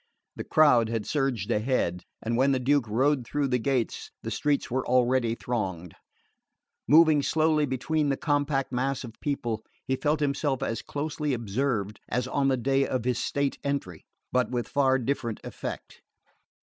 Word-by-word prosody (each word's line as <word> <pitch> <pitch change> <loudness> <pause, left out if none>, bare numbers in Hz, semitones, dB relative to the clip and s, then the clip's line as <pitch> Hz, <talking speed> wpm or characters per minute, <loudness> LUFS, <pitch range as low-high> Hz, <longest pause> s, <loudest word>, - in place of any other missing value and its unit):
The - - -5
crowd 125 -8 +4
had 115 -2 -2
surged 130 -8 -1
ahead, 105 -6 0 0.2
and 115 +1 -1
when 135 +3 +3
the 130 - +1
Duke 135 -1 +2
rode 130 +5 +2
through 140 +3 -1
the 125 -1 +1
gates 130 -1 -1
the - - -4
streets 145 -4 0
were 130 +1 0
already 125 -2 +2
thronged. 95 -9 -3 0.9
Moving 155 -1 +6
slowly 155 0 +2
between 145 +4 0
the 135 - 0
compact 145 -3 0
mass 135 +2 -1
of 115 -3 -8
people 120 -6 -2 0.2
he 130 - 0
felt 150 +3 0
himself 140 -2 0
as 115 - -2
closely 150 -1 -2
observed 110 -2 -2
as 125 +1 -1
on 135 +1 +1
the 135 -1 +2
day 135 +2 +1
of 125 -3 -2
his 125 -1 +1
state 140 -1 -1
entry; 140 - -3 0.3
but 125 -3 +1
with 120 -2 -2
far 135 -2 +3
different 120 -3 -2
effect. - - -7
130 Hz, 160 wpm, -27 LUFS, 120-140 Hz, 0.9 s, Moving